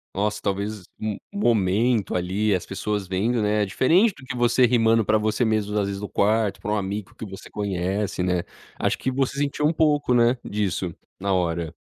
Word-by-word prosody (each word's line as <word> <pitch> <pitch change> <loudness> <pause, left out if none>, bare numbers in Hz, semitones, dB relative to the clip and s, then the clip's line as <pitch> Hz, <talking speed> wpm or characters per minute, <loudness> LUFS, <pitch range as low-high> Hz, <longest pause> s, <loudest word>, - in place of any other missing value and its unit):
Nossa, 105 +2 -1
talvez 100 0 -2
um 110 -2 -3 0.2
um 200 - -4
momento, 110 - +2
ali, 95 +4 +1
as 90 - -3
pessoas 105 +1 -3
vendo, 105 +6 0
né, 105 0 +2
é - - 0
diferente 170 - +3
do - - -13
que 130 - -5
você 120 +1 +4
rimando 115 -2 +3
para 110 +1 +3
você 110 +3 0
mesmo, 105 -2 0
às 100 -1 +1
vezes 100 0 -4
no 105 - -5
quarto, 105 0 +1
para 105 - -3
um 105 - +1
amigo 100 0 -4
que - - -7
você 95 -1 -10
conhece, 95 -1 -2
né. 90 -1 0 0.4
Acho - - +1
que 130 - -2
você 135 +1 -1
sentiu 145 +1 0
um 160 - +1
pouco, 150 -5 +2
né, 120 +1 +4
disso 95 -4 -2 0.2
na 100 0 0
hora. 85 -3 -1
105 Hz, 200 wpm, -24 LUFS, 95-120 Hz, 0.4 s, você